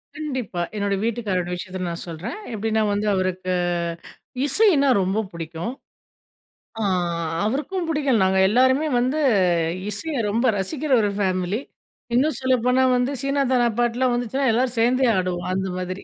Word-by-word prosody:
கண்டிப்பா. 260 -12 -4
என்னோட 200 -1 -1
வீட்டுக்காரரோட 205 -6 -1
விஷயத்த 185 +1 -7
நான் 170 - -5
சொல்றேன். 165 - -6 0.2
எப்பிடின்னா 220 +1 0
வந்து 210 +1 -1
அவருக்கு 185 0 -1 0.9
இசையினா 290 -3 +4
ரொம்ப 190 +4 0
பிடிக்கும். 170 +6 -5 1.1
ஆ, - - -2 0.6
அவருக்கும் 325 - -2
பிடிக்கும். 280 -7 +1
நாங்க 190 0 +2
எல்லாருமே 260 +6 +3
வந்து 260 +5 0 0.7
இசைய 300 +9 -3 0.2
ரொம்ப 230 +4 0
ரசிக்கிற 280 +9 -3
ஒரு 205 - +1
ஃபேமிலி. 185 +1 0 0.6
இன்னும் 300 +5 +2
சொல்லப்போனா 255 0 +2
வந்து 250 +2 0
சீனாதனா 270 -3 +2
பாட்டுலாம் 240 +1 +1
வந்துச்சுன்னா 245 +2 0
எல்லாரும் 245 +1 0
சேர்ந்தே 250 +2 +3
ஆடுவோம், 180 -1 -2
அந்த 190 0 -1
மாதிரி. 185 +1 -5
235 Hz, 125 wpm, -23 LUFS, 190-260 Hz, 1.1 s, இசையினா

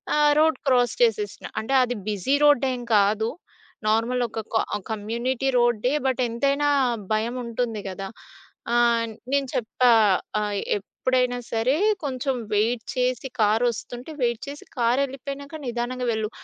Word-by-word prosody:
ఆహ్, 295 0 +5
road 320 +1 +4
cross 245 -2 +3
చేసేసినా 445 -3 +1
అంటే 225 +5 -3
అది 245 0 -2
బిజీ 210 +6 0
రోడ్డేం 265 -3 +3 0.2
కాదు, 210 +2 +2 0.6
నార్మల్ 230 +3 +1
ఒక 225 - -5
క - - -2 0.4
కమ్యూనిటీ 235 +5 -1
రోడ్డే. 240 0 +2
బట్ 260 -1 +1
ఎంతైనా 280 +5 +1 0.4
భయముంటుంది 235 0 -2
కదా? 195 +1 -6 0.7
ఆహ్, 235 -1 +3 0.3
నేను 280 -1 +2
చెప్పా, 245 +2 +2 0.5
ఆహ్, 210 -1 -2 0.2
ఎప్పుడైనా 250 +4 -1
సరే, 230 +4 +2 0.3
కొంచెం 270 -1 -1 0.2
వెయిట్ 225 +3 +1
చేసి 255 +1 0
కారొస్తుంటే 240 +5 0
వెయిట్ 235 -1 0
చేసి 285 +1 -8
కారెళ్ళిపోయినాక 275 +4 -1
నిదానంగా 245 +1 -2
వెళ్ళు. 220 -1 -2
245 Hz, 120 wpm, -24 LUFS, 225-265 Hz, 0.7 s, ఆహ్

